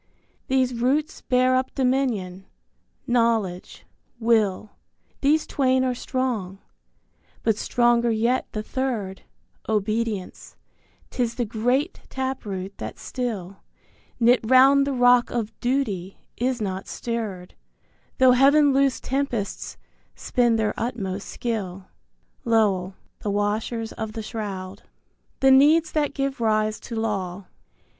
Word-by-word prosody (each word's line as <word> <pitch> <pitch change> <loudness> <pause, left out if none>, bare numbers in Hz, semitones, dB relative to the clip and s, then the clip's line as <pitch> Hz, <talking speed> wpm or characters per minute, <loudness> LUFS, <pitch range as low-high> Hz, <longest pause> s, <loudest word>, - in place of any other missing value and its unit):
These 260 -1 +2
roots 270 +6 0
bear 255 0 +2
up 260 0 -1
Dominion: 240 -9 -1 0.6
Knowledge, 230 -7 0 0.3
Will, 215 -3 +1 0.5
These 300 +3 +3
twain 260 -2 +1
are 255 -1 +1
strong, 240 -7 -3 0.9
but 220 - +2
stronger 240 +2 +2
yet 230 +3 0
the 215 - -4
third, 220 -8 -3 0.5
Obedience, 215 -2 -2 0.6
'tis 235 -2 -1
the 240 -1 -1
great 245 - -1
tap 265 -1 -3
root 190 0 -6
that - - -6
still, 205 -7 -4 0.6
Knit 240 +1 +5
round 265 +4 +5
the - - 0
rock 245 -1 +4
of 230 -3 -3
Duty, 215 -8 -1 0.2
is 250 +1 -1
not 190 -2 -4
stirred, 215 -7 -5 0.6
Though 260 -1 +6
Heaven 280 +3 +5
loosed 275 -1 +2
tempests 255 -7 -3 0.4
spend 240 -2 +1
their 215 -1 0
utmost 205 -5 -3
skill. 195 -6 -4 0.5
Lowell 200 -5 +1 0.2
(The 210 - -4
Washers 215 +3 -1
of 220 -1 -5
the 220 - -5
Shroud). 200 -3 -6
I. - - -32 0.5
THE 270 0 +6
NEEDS 310 +4 +5
THAT 295 -2 -1
GIVE 275 -2 -2
RISE 215 -1 +1
TO 235 - -8
LAW. 200 -4 -3
235 Hz, 120 wpm, -24 LUFS, 205-260 Hz, 0.9 s, Though